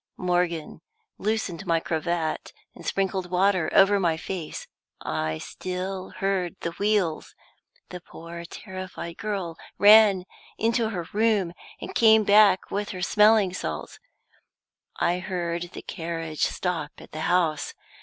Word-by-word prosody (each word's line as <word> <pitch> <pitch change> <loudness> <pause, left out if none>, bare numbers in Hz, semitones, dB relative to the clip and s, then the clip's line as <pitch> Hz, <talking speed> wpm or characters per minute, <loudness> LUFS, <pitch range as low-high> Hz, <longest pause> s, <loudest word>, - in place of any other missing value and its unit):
Morgan 175 -3 -1 0.4
loosened 210 -6 -2
my 165 -1 +3
cravat, 165 0 -2 0.2
and - - -13
sprinkled 190 -2 -1
water 185 -1 +2
over 200 +1 +5
my 170 -4 +1
face 165 -1 -5 0.3
I 80 0 -2
still 185 - -5
heard 190 -3 -1
the 170 - -2
wheels. 200 -3 0 0.5
The 180 - -8
poor 170 0 -9
terrified 185 -2 -8
girl 195 -6 -3 0.2
ran 205 -3 +7 0.3
into 230 0 +1
her 180 -6 -3
room, 210 -5 +2 0.3
and - - -7
came 220 -2 +6
back 200 -2 +5
with 205 0 -2
her 185 -2 -5
smelling 210 -1 +4
salts - - -5 1.0
I 175 +1 +1
heard 175 -2 -3
the - - -8
carriage 165 -3 -3
stop 170 -5 -2
at - - -14
the 155 - -6
house. 165 -4 +1
180 Hz, 125 wpm, -26 LUFS, 170-200 Hz, 1.0 s, ran